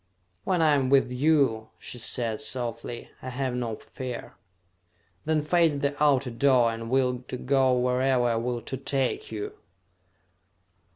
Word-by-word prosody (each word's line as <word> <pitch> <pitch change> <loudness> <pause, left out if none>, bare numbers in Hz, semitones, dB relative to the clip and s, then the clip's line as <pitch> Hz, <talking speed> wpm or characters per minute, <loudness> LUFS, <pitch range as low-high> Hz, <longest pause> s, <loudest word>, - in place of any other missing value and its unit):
"When 180 -3 +2
I 155 -2 +5
am 135 -3 +2
with 135 -2 +4
you," 130 -5 +2
she 125 - -7
said 115 0 -1
softly, 120 -3 -4
"I 130 - -6
have 130 0 -2
no 120 -3 -2
fear." 125 +2 -7 0.9
"Then 155 -1 +1
face 165 -1 +3
the 140 0 -1
outer 140 -3 +3
door, 120 -1 +3
and 115 0 -6
will 125 -1 +2
to 125 - -4
go 130 0 +2
wherever 125 +1 +2
I 120 -1 +2
will 120 0 -2
to 130 - -4
take 135 - -2
you!" 415 0 -5
130 Hz, 150 wpm, -27 LUFS, 120-140 Hz, 0.9 s, I